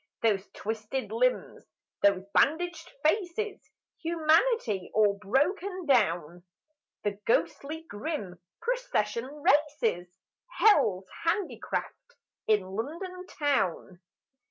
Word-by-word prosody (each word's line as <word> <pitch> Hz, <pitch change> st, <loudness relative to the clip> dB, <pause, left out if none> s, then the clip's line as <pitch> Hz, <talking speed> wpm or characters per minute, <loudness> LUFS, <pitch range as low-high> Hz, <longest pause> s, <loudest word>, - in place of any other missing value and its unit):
Those 205 Hz, -3 st, +1 dB
twisted 220 Hz, +4 st, -4 dB
limbs, -, -, 0 dB, 0.4 s
those 195 Hz, -2 st, +4 dB
bandaged 340 Hz, +2 st, +1 dB
faces! 390 Hz, +4 st, 0 dB, 0.3 s
Humanity 325 Hz, -, +2 dB
all 205 Hz, -2 st, +3 dB
broken 350 Hz, -, 0 dB
down! 175 Hz, -, +2 dB, 0.6 s
The 205 Hz, -1 st, -2 dB
ghostly 305 Hz, +7 st, 0 dB
grim 205 Hz, -, -5 dB, 0.2 s
procession 465 Hz, -, -1 dB
races: 285 Hz, -, +1 dB, 0.5 s
Hell's 240 Hz, -, +4 dB, 0.2 s
handicraft 400 Hz, +6 st, -2 dB, 0.3 s
in 215 Hz, -2 st, +4 dB
London 335 Hz, -, -5 dB
Town. 190 Hz, -, -1 dB
285 Hz, 85 wpm, -29 LUFS, -, 0.6 s, those